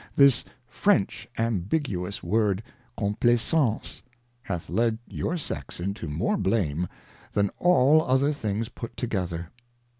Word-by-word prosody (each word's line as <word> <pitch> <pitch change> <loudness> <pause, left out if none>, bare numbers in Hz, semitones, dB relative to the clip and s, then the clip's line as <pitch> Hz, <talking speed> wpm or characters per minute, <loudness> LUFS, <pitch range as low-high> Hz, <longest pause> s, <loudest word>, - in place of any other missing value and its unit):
This 140 -3 +6 0.2
French - - +1
ambiguous 105 - -1
word 105 -2 +1 0.3
Complaisance 120 +4 +1 0.4
hath 90 -8 -4
led 110 +4 +1
your 175 - -2
Sex 155 - -5
into 95 0 -3
more 85 - 0
blame, 90 - 0 0.5
than 100 -1 +2
all 155 -3 +5
other 140 +1 +2
things 110 -4 -2
put 115 - -8
together. 90 -7 -3
110 Hz, 110 wpm, -26 LUFS, 95-130 Hz, 0.5 s, This